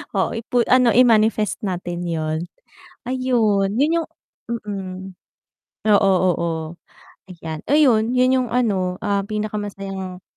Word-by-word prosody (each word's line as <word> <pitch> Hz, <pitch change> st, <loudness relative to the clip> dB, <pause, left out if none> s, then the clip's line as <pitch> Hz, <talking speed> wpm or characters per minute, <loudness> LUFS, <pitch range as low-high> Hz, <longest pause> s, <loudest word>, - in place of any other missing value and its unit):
oo -, -, +1 dB
ipu 235 Hz, +1 st, 0 dB
ano 250 Hz, -2 st, +5 dB
i-manifest 220 Hz, -4 st, +3 dB
natin 175 Hz, -2 st, -4 dB
yun. 155 Hz, -1 st, -2 dB, 0.7 s
Ayun, 235 Hz, -6 st, +1 dB
yun 315 Hz, +4 st, +3 dB
yung -, -, -12 dB, 0.4 s
mm, 200 Hz, -5 st, -5 dB, 1.0 s
oo, 200 Hz, -1 st, +4 dB, 0.2 s
oo. 170 Hz, 0 st, -2 dB, 0.8 s
Ayan, 160 Hz, -3 st, -7 dB
ayun 250 Hz, -7 st, +4 dB
yun 255 Hz, 0 st, +3 dB
yung 245 Hz, -, -4 dB
ano, 190 Hz, -7 st, 0 dB
ah, 200 Hz, -2 st, 0 dB
pinakamasayang 200 Hz, -3 st, -5 dB
210 Hz, 110 wpm, -21 LUFS, 185-240 Hz, 1.0 s, ano